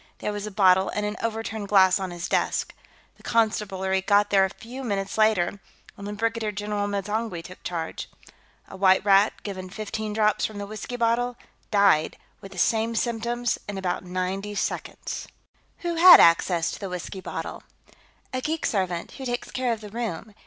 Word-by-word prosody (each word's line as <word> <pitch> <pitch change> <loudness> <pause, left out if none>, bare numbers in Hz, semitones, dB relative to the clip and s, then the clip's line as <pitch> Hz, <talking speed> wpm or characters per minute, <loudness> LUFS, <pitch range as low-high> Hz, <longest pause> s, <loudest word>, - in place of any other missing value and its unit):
There 210 - -3
was 205 0 -4
a - - -6
bottle 190 -1 +4
and 210 - -2
an 210 0 -2
overturned 225 -2 -3
glass 190 -1 +5
on 190 -1 -3
his 175 0 -5
desk. - - 0 0.4
The - - -20
Constabulary 195 -4 0
got 205 +1 +3
there 195 -1 +5
a 190 - +1
few 245 +6 -9
minutes 195 -4 -2
later, 210 -3 +2 0.4
and 200 -2 -8
then 210 - -5
Brigadier 225 0 -1
General 205 0 -2
M'zangwe 205 -2 -3
took 185 - -12
charge. 165 -2 -5 0.6
A - - -10
white 190 0 +4
rat, 200 +1 +5
given 185 -2 -6
fifteen 215 +2 -4
drops 215 0 +1
from 215 - -2
the 205 - -4
whiskey 215 +4 -6
bottle, 240 +1 +1 0.3
died 200 -7 +3 0.2
with 195 - -10
the 190 - -11
same 225 +5 +1
symptoms 235 +1 -1
in 200 - -4
about 185 -1 -2
ninety 185 +3 -3
seconds." - - -4 0.5
"Who 345 -2 -1
had 350 +2 +10
access 170 0 +4
to - - -7
the 195 - -5
whiskey 180 +1 -6
bottle?" - - -6 0.7
"A 255 - -1
geek 315 +3 -2
servant, 185 -4 -1
who 265 - -8
takes 245 -1 -3
care 255 -2 -1
of 225 -2 -3
the 210 - -9
room. 220 -2 -5
205 Hz, 180 wpm, -25 LUFS, 190-225 Hz, 0.7 s, had